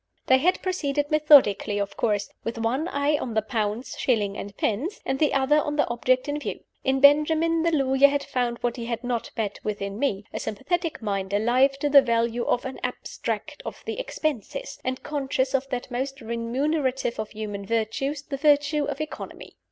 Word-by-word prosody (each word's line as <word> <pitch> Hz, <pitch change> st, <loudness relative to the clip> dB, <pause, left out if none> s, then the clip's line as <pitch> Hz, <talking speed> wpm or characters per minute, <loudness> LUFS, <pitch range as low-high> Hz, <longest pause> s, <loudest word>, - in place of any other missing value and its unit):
They 260 Hz, 0 st, +5 dB
had 360 Hz, +7 st, +1 dB
proceeded 290 Hz, -6 st, -1 dB
methodically, 285 Hz, -10 st, +5 dB
of 200 Hz, -1 st, -2 dB
course, 205 Hz, -3 st, 0 dB, 0.2 s
with 230 Hz, +1 st, -4 dB
one 245 Hz, +8 st, 0 dB
eye 290 Hz, -2 st, +1 dB
on 235 Hz, -3 st, -4 dB
the 220 Hz, -, +3 dB
pounds, 220 Hz, +2 st, -2 dB
shillings, 210 Hz, -6 st, +1 dB
and 200 Hz, 0 st, -7 dB
pence, 280 Hz, -, -1 dB
and 265 Hz, 0 st, -1 dB
the 300 Hz, -, +3 dB
other 275 Hz, +3 st, +3 dB
on 295 Hz, 0 st, -3 dB
the 295 Hz, -, +2 dB
object 255 Hz, +3 st, +1 dB
in 290 Hz, +1 st, -2 dB
view. -, -, -5 dB, 0.2 s
In 265 Hz, 0 st, +1 dB
Benjamin, 315 Hz, +3 st, +5 dB
the 335 Hz, -, +2 dB
lawyer 275 Hz, -3 st, +4 dB
had 280 Hz, 0 st, -1 dB
found 245 Hz, -2 st, -1 dB
what 240 Hz, +1 st, -1 dB
he 235 Hz, -, -5 dB
had 235 Hz, 0 st, -3 dB
not 245 Hz, -2 st, -2 dB
met 210 Hz, -3 st, -2 dB
with 210 Hz, -1 st, -3 dB
in 200 Hz, +1 st, -4 dB
me 205 Hz, -8 st, -1 dB
a -, -, -3 dB
sympathetic 330 Hz, -, -2 dB
mind, 195 Hz, -2 st, -2 dB
alive 250 Hz, +6 st, +3 dB
to 295 Hz, -, +2 dB
the 285 Hz, -1 st, +8 dB
value 235 Hz, 0 st, 0 dB
of 245 Hz, -, 0 dB
"an 265 Hz, -, -5 dB
abstract -, -, -4 dB
of -, -, -8 dB
the -, -, -4 dB
expenses," 310 Hz, -, -3 dB
and 255 Hz, 0 st, -3 dB
conscious 270 Hz, -2 st, -1 dB
of 270 Hz, 0 st, 0 dB
that 250 Hz, 0 st, -4 dB
most 270 Hz, +2 st, -3 dB
remunerative 255 Hz, +3 st, -1 dB
of 215 Hz, -, -3 dB
human 210 Hz, -2 st, -5 dB
virtues, 230 Hz, +7 st, -1 dB
the 280 Hz, -1 st, -5 dB
virtue 290 Hz, 0 st, +3 dB
of 285 Hz, +1 st, -4 dB
economy. 310 Hz, -, -7 dB
260 Hz, 190 wpm, -25 LUFS, 230-290 Hz, 0.2 s, the